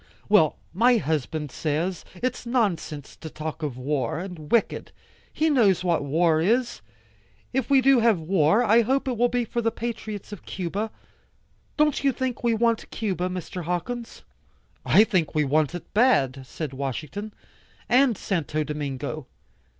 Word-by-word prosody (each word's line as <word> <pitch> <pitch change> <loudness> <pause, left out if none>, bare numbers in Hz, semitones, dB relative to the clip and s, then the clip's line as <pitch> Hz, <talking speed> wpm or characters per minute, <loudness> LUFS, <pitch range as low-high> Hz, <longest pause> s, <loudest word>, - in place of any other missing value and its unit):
"Well, 200 -8 +4 0.2
my 240 +6 +4
husband 155 - -2
says, 165 +4 -2
its 250 +6 -3
nonsense 200 - -1
to 160 - -8
talk 155 +1 -6
of 145 -5 -3
war, 145 +3 -1
and 170 -4 -7
wicked. 235 - +1 0.4
He 315 - +1
knows 220 - +3
what 170 -4 +1
war 160 +2 +2
is. 235 +7 +1 0.7
If 265 0 -1
we 275 -1 +5
do 270 -1 +5
have 225 -5 +3
war, 165 +5 +3
I 230 +1 +5
hope 265 +4 0
it 255 - 0
will 240 +2 +2
be 245 0 0
for 235 +2 -2
the 230 - +2
patriots 220 -3 -6
of 205 - -8
Cuba. 195 +4 -3 0.9
Don't 300 -2 +2
you 275 - +4
think 255 -2 -3
we 235 -1 +2
want 230 0 +1
Cuba, 185 -4 -2
Mr. 180 -1 -5
Hawkins?" 225 +8 -4 0.6
"I 210 - +6
think 185 -10 0
we 155 - +3
want 150 +3 +1
it 170 -2 -9
bad," 135 - +2
said 150 -1 -5
Washington. 150 - -4 0.6
"And 250 -3 +4
Santo 155 -5 -1
Domingo. 145 -1 -4
185 Hz, 155 wpm, -25 LUFS, 155-235 Hz, 0.9 s, I